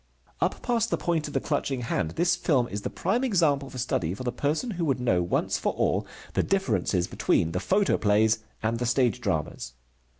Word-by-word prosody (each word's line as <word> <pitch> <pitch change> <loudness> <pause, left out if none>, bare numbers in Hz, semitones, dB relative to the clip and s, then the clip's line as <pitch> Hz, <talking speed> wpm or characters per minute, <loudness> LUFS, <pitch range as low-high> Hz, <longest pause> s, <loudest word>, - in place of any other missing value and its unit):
Up - - 0
past 230 -2 +1
the - - 0
point 165 -3 -1
of 145 - -9
the - - +3
clutching 140 -4 -1
hand 90 -8 -1
this 175 +2 +3
film 145 -9 +1
is 100 +1 -4
the - - -3
prime 245 +3 -1
example 155 - +2
for 130 - -9
study 90 -8 -1
for 115 - -7
the 125 - -1
person 155 - -1
who 175 -4 -2
would 135 -4 +1
know 95 -8 +2
once 85 - 0
for - - 0
all - - 0 0.3
the - - +2
differences 105 - +1
between 80 - +1
the 90 - -1
photoplays 110 - +2 0.2
and 115 +1 0
the 120 - -1
stage 125 -3 +2
dramas. 60 - -2
130 Hz, 200 wpm, -27 LUFS, 105-170 Hz, 0.3 s, the